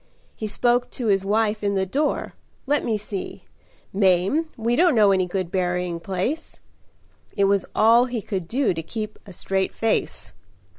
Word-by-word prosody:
He 215 Hz, -, -4 dB
spoke 240 Hz, +3 st, +1 dB
to 235 Hz, -4 st, -3 dB
his 195 Hz, -1 st, +3 dB
wife 215 Hz, +1 st, 0 dB
in 200 Hz, 0 st, +1 dB
the 190 Hz, 0 st, +1 dB
door, 285 Hz, +10 st, -1 dB, 0.3 s
'Let 290 Hz, +1 st, +1 dB
me 220 Hz, -2 st, 0 dB
see, 205 Hz, -2 st, -6 dB, 0.5 s
Mame, 195 Hz, -, +2 dB
we 230 Hz, +1 st, 0 dB
don't 340 Hz, 0 st, +4 dB
know 210 Hz, -3 st, +5 dB
any 185 Hz, -1 st, +2 dB
good 180 Hz, -1 st, -3 dB
berrying 180 Hz, -2 st, -1 dB
place?' 195 Hz, -, -3 dB, 0.8 s
It 200 Hz, -, +3 dB
was 195 Hz, -1 st, +2 dB
all 230 Hz, +3 st, +5 dB
he 240 Hz, -4 st, -4 dB
could 185 Hz, -5 st, -4 dB
do 255 Hz, +1 st, +1 dB
to 165 Hz, -, -4 dB
keep 215 Hz, +6 st, -6 dB
a -, -, -9 dB
straight 190 Hz, +1 st, -2 dB
face. 225 Hz, -1 st, -1 dB
205 Hz, 165 wpm, -23 LUFS, 190-235 Hz, 0.8 s, know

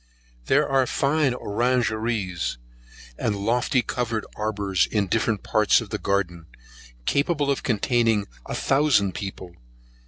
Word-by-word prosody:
There 145 Hz, +2 st, +3 dB
are 135 Hz, -2 st, +2 dB
fine 140 Hz, -1 st, +1 dB
orangeries, 110 Hz, -, -1 dB, 0.6 s
and 105 Hz, -, 0 dB
lofty 120 Hz, +5 st, +1 dB
covered 115 Hz, -3 st, -2 dB
arbours 100 Hz, -3 st, 0 dB
in 105 Hz, -2 st, 0 dB
different 110 Hz, +1 st, 0 dB
parts 105 Hz, -1 st, +3 dB
of 115 Hz, -4 st, -8 dB
the -, -, -2 dB
garden, 90 Hz, -4 st, -1 dB, 0.6 s
capable 145 Hz, 0 st, +1 dB
of 140 Hz, -, -1 dB
containing 115 Hz, -2 st, +1 dB, 0.2 s
a -, -, -4 dB
thousand 135 Hz, -9 st, +2 dB
people. 95 Hz, -3 st, -7 dB
115 Hz, 120 wpm, -24 LUFS, 100-130 Hz, 0.6 s, There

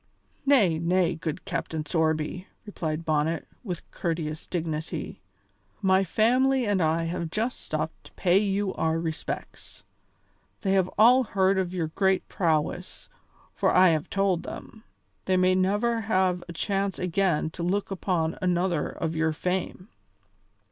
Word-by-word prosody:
"Nay, 205 Hz, -, +4 dB
nay, 175 Hz, +1 st, +2 dB
good 160 Hz, -1 st, -5 dB
Captain 155 Hz, -2 st, -3 dB
Sorby," 160 Hz, +3 st, -1 dB, 0.2 s
replied 165 Hz, -5 st, -4 dB
Bonnet, 155 Hz, +1 st, 0 dB, 0.2 s
with 180 Hz, -7 st, -5 dB
courteous 160 Hz, -3 st, -3 dB
dignity, 160 Hz, -2 st, -4 dB, 0.6 s
"my 190 Hz, 0 st, +3 dB
family 250 Hz, +7 st, +2 dB
and 205 Hz, -3 st, +1 dB
I 160 Hz, +1 st, +2 dB
have 170 Hz, 0 st, -3 dB
just 225 Hz, +8 st, -2 dB
stopped -, -, -4 dB
to -, -, -14 dB
pay 185 Hz, +1 st, +3 dB
you 200 Hz, -1 st, 0 dB
our 160 Hz, +1 st, 0 dB
respects. 160 Hz, -1 st, -6 dB, 0.8 s
They 195 Hz, -, 0 dB
have 190 Hz, -2 st, +3 dB
all 245 Hz, +5 st, +7 dB
heard 190 Hz, -2 st, +2 dB
of 180 Hz, -2 st, -1 dB
your 170 Hz, -4 st, -2 dB
great 190 Hz, +2 st, +1 dB
prowess, 160 Hz, -5 st, -1 dB, 0.4 s
for -, -, +1 dB
I 185 Hz, -1 st, +7 dB
have 155 Hz, -2 st, 0 dB
told 195 Hz, -3 st, +1 dB
them. 220 Hz, -, -9 dB, 0.4 s
They 185 Hz, -1 st, +2 dB
may 185 Hz, 0 st, +4 dB
never 205 Hz, +5 st, +1 dB
have 185 Hz, -4 st, +1 dB
a -, -, -5 dB
chance 195 Hz, +2 st, -1 dB
again 180 Hz, -3 st, 0 dB
to 170 Hz, -, -8 dB
look 195 Hz, +4 st, -1 dB
upon 175 Hz, -4 st, -1 dB
another 180 Hz, -1 st, +1 dB
of 165 Hz, -1 st, -4 dB
your 160 Hz, 0 st, +1 dB
fame." 180 Hz, +3 st, -3 dB
180 Hz, 140 wpm, -26 LUFS, 160-195 Hz, 0.8 s, all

